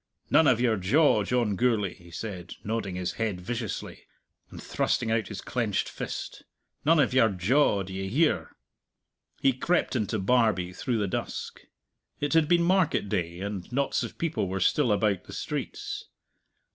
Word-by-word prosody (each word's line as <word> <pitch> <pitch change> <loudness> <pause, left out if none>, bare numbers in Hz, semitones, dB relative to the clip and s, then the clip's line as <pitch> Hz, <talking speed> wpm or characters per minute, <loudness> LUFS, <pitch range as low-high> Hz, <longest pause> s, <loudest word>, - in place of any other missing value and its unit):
"None 160 - +6
of 125 -4 +4
your 120 -3 +2
jaw, 110 - +4
John 115 -2 +1
Gourlay!" 105 -4 +1
he 85 0 -17
said, 90 -1 -6
nodding 105 -3 -2
his 90 -1 -2
head 105 -5 -1
viciously, 110 +3 -5 0.4
and - - -10
thrusting 110 - -1
out 115 -1 +1
his 105 - -6
clenched 115 -6 -1
fist - - -6 0.4
"none 160 +2 +4
of 130 -4 +3
your 125 -4 +5
jaw; 100 +3 +2
d'ye 95 +1 -5
hear?" 150 +10 +1 0.9
He 135 - +4
crept 170 +4 0
into 110 -2 0
Barbie 105 -4 +2
through 120 +5 -2
the 105 -2 0
dusk. - - -4 0.6
It 145 +2 -1
had 160 -2 +4
been 170 +1 +4
market 180 - +2
day, 85 -3 -2
and 100 0 -5
knots 140 +2 0
of - - -6
people 165 - -1
were 95 +1 -2
still 130 +3 +2
about 105 -2 +1
the - - -10
streets. - - -4
110 Hz, 160 wpm, -27 LUFS, 95-130 Hz, 0.9 s, None